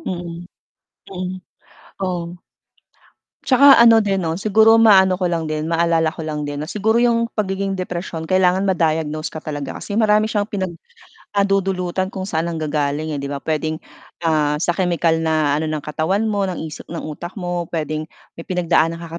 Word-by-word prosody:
Mm. 175 Hz, -1 st, -6 dB, 0.6 s
Mm. 185 Hz, 0 st, -5 dB, 0.6 s
Oo. 175 Hz, -3 st, -3 dB, 1.1 s
'Tsaka 275 Hz, +1 st, +7 dB
ano 230 Hz, -1 st, +7 dB
din 195 Hz, -1 st, 0 dB
'no, 165 Hz, -2 st, -1 dB
siguro 220 Hz, +3 st, +5 dB
maano 190 Hz, -4 st, +6 dB
ko 185 Hz, -, -3 dB
lang 165 Hz, -2 st, -1 dB
din, 155 Hz, +1 st, -3 dB
maalala 165 Hz, -1 st, +2 dB
ko 170 Hz, -, -10 dB
lang 150 Hz, -1 st, -3 dB
din 145 Hz, 0 st, -5 dB
'no 150 Hz, -, -4 dB
siguro 215 Hz, +4 st, +1 dB
yung 230 Hz, -1 st, +2 dB
pagiging 195 Hz, -2 st, -2 dB
depresyon, 175 Hz, -2 st, -5 dB
kailangan 185 Hz, +1 st, +2 dB
ma-diagnose 160 Hz, -4 st, 0 dB
ka -, -, -6 dB
talaga 145 Hz, -2 st, -5 dB
kasi 200 Hz, -, -6 dB
marami 215 Hz, -1 st, +3 dB
siyang 205 Hz, -2 st, 0 dB
pinag 190 Hz, -5 st, -3 dB, 0.6 s
ah, 200 Hz, -, +5 dB
dudulutan 190 Hz, -2 st, 0 dB
kung 190 Hz, -1 st, -6 dB
saan 165 Hz, -3 st, -2 dB
nanggagaling, 155 Hz, -1 st, -2 dB
eh, 145 Hz, -, -3 dB
'di 140 Hz, -, -4 dB
ba? 140 Hz, -1 st, -5 dB
Puwedeng, 155 Hz, 0 st, -1 dB, 0.5 s
ah, 155 Hz, -2 st, +2 dB
sa 175 Hz, -, +2 dB
kemikal 170 Hz, -2 st, +1 dB
na 155 Hz, -3 st, +1 dB
ano 160 Hz, -, -2 dB
ng 155 Hz, -1 st, -3 dB
katawan 160 Hz, +7 st, -1 dB
mo, 200 Hz, -2 st, 0 dB
ng 180 Hz, -3 st, -4 dB
isip -, -, -10 dB
ng 170 Hz, -, -5 dB
utak 165 Hz, +4 st, -7 dB
mo, 175 Hz, -2 st, -3 dB
puwedeng 155 Hz, -1 st, -3 dB, 0.3 s
may 165 Hz, -, -9 dB
pinagdaanan 170 Hz, -2 st, +1 dB
ka 170 Hz, 0 st, -7 dB
175 Hz, 170 wpm, -20 LUFS, 160-195 Hz, 1.1 s, Tsaka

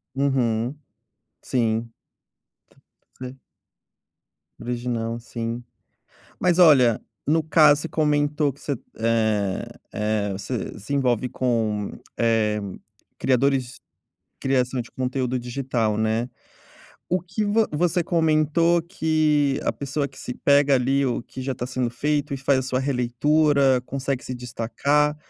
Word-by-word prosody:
Uhum, 130 Hz, -2 st, 0 dB, 0.7 s
sim. 115 Hz, -2 st, -1 dB, 1.3 s
É. 130 Hz, +1 st, -7 dB, 1.2 s
Original, 120 Hz, -1 st, -3 dB
sim. 115 Hz, 0 st, -5 dB, 0.8 s
Mas 180 Hz, -1 st, +2 dB
olha, 130 Hz, -9 st, +6 dB, 0.2 s
no 160 Hz, +2 st, +3 dB
caso, 150 Hz, -1 st, +5 dB
você 165 Hz, -, -4 dB
comentou 150 Hz, -2 st, +1 dB
que 140 Hz, -, -21 dB
você 145 Hz, -, -2 dB, 0.3 s
eh 110 Hz, -4 st, +1 dB, 0.3 s
eh, 105 Hz, -1 st, -1 dB
você 100 Hz, +3 st, -5 dB
se 110 Hz, +8 st, -6 dB
envolve 125 Hz, -3 st, +1 dB
com, 110 Hz, -5 st, -1 dB, 0.3 s
eh, 110 Hz, -2 st, +2 dB, 0.6 s
criadores 130 Hz, 0 st, +1 dB, 0.6 s
criação 130 Hz, -1 st, 0 dB
de 120 Hz, -, -12 dB
conteúdo 130 Hz, 0 st, -2 dB
digital, 120 Hz, -3 st, -1 dB
né. 110 Hz, +3 st, 0 dB, 0.8 s
O 180 Hz, 0 st, 0 dB
que 195 Hz, +4 st, -3 dB
vo 215 Hz, +2 st, +2 dB
você 170 Hz, +3 st, +1 dB
comentou 165 Hz, +1 st, +2 dB
que 155 Hz, -4 st, +1 dB
a -, -, +1 dB
pessoa 140 Hz, +1 st, -3 dB
que -, -, -18 dB
se 125 Hz, -, -5 dB
pega 140 Hz, +1 st, +3 dB
ali, 135 Hz, +2 st, +2 dB
o 120 Hz, -1 st, -1 dB
que 130 Hz, -, -9 dB
já 135 Hz, +1 st, -2 dB
tá 125 Hz, -, -5 dB
sendo 125 Hz, -1 st, -1 dB
feito 145 Hz, +3 st, -1 dB
e 140 Hz, -, -2 dB
faz 135 Hz, 0 st, +2 dB
a -, -, -1 dB
sua 130 Hz, 0 st, -1 dB
releitura, 135 Hz, +1 st, +2 dB
consegue 135 Hz, -1 st, -3 dB
se 130 Hz, -, -4 dB
destacar, 135 Hz, +5 st, 0 dB
130 Hz, 125 wpm, -24 LUFS, 120-150 Hz, 1.3 s, olha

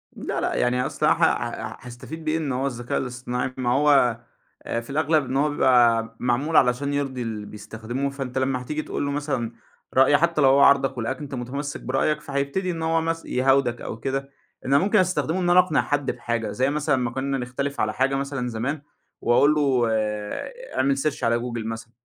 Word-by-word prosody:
لأ -, -, -3 dB
لأ -, -, -1 dB
يعني 125 Hz, +1 st, +1 dB
أصلًا -, -, +1 dB
ه -, -, +6 dB
ه -, -, 0 dB
هاستفيد 140 Hz, +7 st, -9 dB
بإيه 155 Hz, +1 st, +1 dB
إن 155 Hz, -4 st, -2 dB
هو 130 Hz, +2 st, -1 dB
الذكاء 120 Hz, -2 st, -3 dB
الاصطناعي 125 Hz, 0 st, -3 dB
ما 125 Hz, -2 st, -1 dB
هو، 135 Hz, -3 st, +4 dB, 0.5 s
آآ 115 Hz, -, -2 dB
في 120 Hz, -, -15 dB
الأغلب 155 Hz, +1 st, +2 dB
إن 130 Hz, +1 st, -2 dB
هو 150 Hz, +2 st, +2 dB
بيبقى 120 Hz, -5 st, +3 dB
معمول 125 Hz, +6 st, 0 dB
علشان 130 Hz, +3 st, +2 dB
يرضي 135 Hz, -3 st, -2 dB
اللي 110 Hz, -3 st, -4 dB
بيستخدمه 110 Hz, +6 st, -5 dB
فأنت 135 Hz, -2 st, -5 dB
لمّا 130 Hz, -1 st, 0 dB
هتيجي 150 Hz, +4 st, -3 dB
تقول 145 Hz, -, -3 dB
له 140 Hz, -, -1 dB
مثلًا، 140 Hz, -5 st, -2 dB, 0.4 s
رأي 135 Hz, +2 st, +5 dB
حتى 165 Hz, 0 st, +1 dB
لو 135 Hz, -, +6 dB
هو 135 Hz, +1 st, +5 dB
عارضك 140 Hz, -1 st, +4 dB
ولقاك 120 Hz, +3 st, -2 dB
أنت 140 Hz, -2 st, -6 dB
متمسك 140 Hz, +4 st, -5 dB
برأيك 135 Hz, +4 st, 0 dB
فهيبتدي 140 Hz, +7 st, -2 dB
إن 165 Hz, -1 st, -5 dB
هو 165 Hz, 0 st, +1 dB
مث 165 Hz, 0 st, -2 dB
يهاودك 130 Hz, -2 st, +2 dB
أو -, -, -5 dB
كده، 135 Hz, +3 st, -3 dB, 0.4 s
إن 135 Hz, -, +2 dB
ممكن 205 Hz, +4 st, +3 dB
نستخدمه 185 Hz, -1 st, 0 dB
إن 175 Hz, -1 st, +1 dB
أقنع 180 Hz, -3 st, +4 dB
حد 145 Hz, -2 st, -1 dB
بحاجة 115 Hz, -3 st, -3 dB
زي 130 Hz, +5 st, +1 dB
مثلًا 150 Hz, 0 st, +1 dB
ما 125 Hz, -2 st, -1 dB
كنّا 135 Hz, +2 st, -2 dB
نختلف 135 Hz, +3 st, -4 dB
على 110 Hz, 0 st, 0 dB
حاجة 135 Hz, +1 st, +1 dB
مثلًا 135 Hz, -2 st, -2 dB
زمان، 125 Hz, +6 st, -3 dB, 0.4 s
وأقول 140 Hz, +5 st, +4 dB
له 135 Hz, -5 st, +2 dB
آآ 105 Hz, -, -2 dB, 0.2 s
أعمل 135 Hz, +1 st, +2 dB
search 145 Hz, +1 st, -2 dB
على 115 Hz, 0 st, +2 dB
جوجل 120 Hz, -2 st, -4 dB
مثلًا، 115 Hz, 0 st, -6 dB
135 Hz, 195 wpm, -24 LUFS, 120-145 Hz, 0.5 s, ه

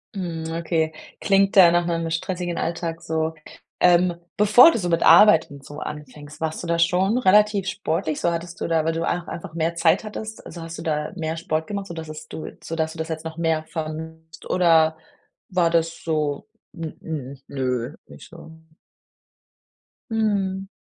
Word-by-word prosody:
Mhm, 165 Hz, -3 st, -4 dB
okay, 165 Hz, -1 st, -1 dB, 0.3 s
klingt 195 Hz, -1 st, +2 dB
da 180 Hz, -4 st, +8 dB
nach 175 Hz, 0 st, +2 dB
'nem 165 Hz, -1 st, -1 dB
stressigen 175 Hz, +1 st, -3 dB
Alltag 165 Hz, -1 st, -3 dB
so. 160 Hz, -1 st, -1 dB, 0.5 s
Ähm, 175 Hz, 0 st, +4 dB, 0.2 s
bevor 215 Hz, +10 st, +8 dB
du -, -, -1 dB
so 175 Hz, -3 st, -2 dB
mit 165 Hz, -1 st, +1 dB
Arbeit 170 Hz, -2 st, +7 dB
und 140 Hz, -1 st, -11 dB
so 145 Hz, +2 st, -9 dB
anfängst, 150 Hz, 0 st, -9 dB
warst 160 Hz, +1 st, -3 dB
du -, -, -5 dB
da 170 Hz, 0 st, 0 dB
schon 185 Hz, +6 st, +2 dB
relativ 210 Hz, -2 st, +4 dB
sportlich 165 Hz, -5 st, -2 dB
so 170 Hz, -, +1 dB
hattest 170 Hz, +1 st, -5 dB
du -, -, -2 dB
da, 165 Hz, -1 st, +1 dB
weil 165 Hz, -, +1 dB
du 165 Hz, +1 st, -2 dB
auch 175 Hz, 0 st, -2 dB
einfach 170 Hz, -1 st, -7 dB
mehr 165 Hz, 0 st, -1 dB
Zeit 165 Hz, +4 st, +3 dB
hattest, 215 Hz, +1 st, -7 dB
also 170 Hz, -, -9 dB
hast 165 Hz, 0 st, -7 dB
du -, -, -5 dB
da 150 Hz, -2 st, -2 dB
mehr 160 Hz, -1 st, -3 dB
Sport 160 Hz, -2 st, -2 dB
gemacht, 200 Hz, -1 st, -4 dB
sodass 160 Hz, -2 st, -7 dB
es 155 Hz, 0 st, -9 dB
du 160 Hz, -, -7 dB, 0.2 s
sodass 160 Hz, 0 st, -2 dB
du -, -, -13 dB
das 160 Hz, +1 st, -4 dB
jetzt 160 Hz, 0 st, -5 dB
noch 160 Hz, 0 st, -6 dB
mehr 160 Hz, -2 st, 0 dB
vermisst, 160 Hz, 0 st, -7 dB
oder 160 Hz, -3 st, +4 dB, 0.5 s
war 180 Hz, -3 st, +2 dB
das 165 Hz, 0 st, 0 dB
so, 155 Hz, -3 st, -1 dB, 0.3 s
hm, 155 Hz, -5 st, -6 dB
nö 130 Hz, 0 st, -2 dB
nicht -, -, -13 dB
so? 165 Hz, -1 st, -13 dB, 1.6 s
Mhm. 200 Hz, -4 st, 0 dB
165 Hz, 175 wpm, -23 LUFS, 160-180 Hz, 1.6 s, da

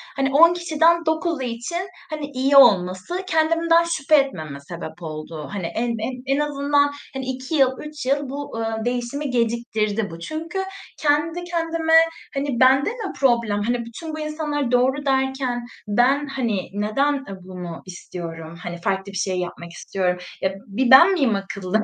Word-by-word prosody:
hani, 275 Hz, 0 st, +1 dB
10 335 Hz, +3 st, +8 dB
kişiden 335 Hz, 0 st, +2 dB
9'u 320 Hz, -1 st, 0 dB
için, 255 Hz, +10 st, -3 dB, 0.2 s
hani, 305 Hz, -2 st, -4 dB
iyi 270 Hz, +2 st, +2 dB
olması 200 Hz, -, +4 dB
kendimden 330 Hz, +1 st, +3 dB
şüphe 315 Hz, -3 st, +2 dB
etmeme 160 Hz, -, 0 dB
sebep 170 Hz, +4 st, -9 dB
oldu. 155 Hz, -1 st, -7 dB
Hani, 195 Hz, -4 st, -3 dB
en 240 Hz, +1 st, 0 dB
en 255 Hz, +4 st, -2 dB
en -, -, 0 dB
azından, 285 Hz, 0 st, +2 dB, 0.2 s
hani, 265 Hz, -1 st, -4 dB
2 260 Hz, +3 st, -4 dB
yıl, 270 Hz, -3 st, +5 dB
3 300 Hz, -3 st, -7 dB
yıl 280 Hz, +1 st, 0 dB
bu, 285 Hz, -3 st, -6 dB
ııı, 225 Hz, 0 st, -2 dB
değişimi 245 Hz, +4 st, -2 dB
geciktirdi 225 Hz, -3 st, 0 dB
bu. 165 Hz, -, -9 dB
Çünkü 325 Hz, -, -4 dB, 0.4 s
kendi 310 Hz, +4 st, +1 dB
kendime, 330 Hz, -2 st, -1 dB, 0.4 s
hani, 275 Hz, -3 st, -2 dB
bende 265 Hz, +4 st, +5 dB
mi 450 Hz, -3 st, -5 dB
problem, 235 Hz, -6 st, +2 dB
hani, 240 Hz, +1 st, -1 dB
bütün 310 Hz, +8 st, -8 dB
bu 310 Hz, -, -5 dB
insanlar 305 Hz, -3 st, -2 dB
"doğru" 260 Hz, +3 st, +2 dB
derken 265 Hz, -2 st, 0 dB, 0.2 s
ben, 255 Hz, +7 st, +2 dB
hani, 235 Hz, -8 st, -2 dB
neden, 215 Hz, +8 st, +1 dB
ııı, 270 Hz, -9 st, -6 dB
bunu 180 Hz, -2 st, -8 dB
istiyorum, 170 Hz, -3 st, -8 dB
hani, 175 Hz, 0 st, -6 dB
farklı 195 Hz, +1 st, -1 dB
bir 195 Hz, -, -5 dB
şey 185 Hz, 0 st, -1 dB
yapmak 170 Hz, -1 st, -6 dB
istiyorum? 180 Hz, +1 st, -2 dB, 0.2 s
Ya, 190 Hz, -, +2 dB
b -, -, -9 dB
bir 240 Hz, +5 st, 0 dB
ben 340 Hz, +9 st, +9 dB
miyim 270 Hz, -, +2 dB
akıllı? 195 Hz, +1 st, -2 dB
260 Hz, 160 wpm, -22 LUFS, 205-300 Hz, 0.4 s, ben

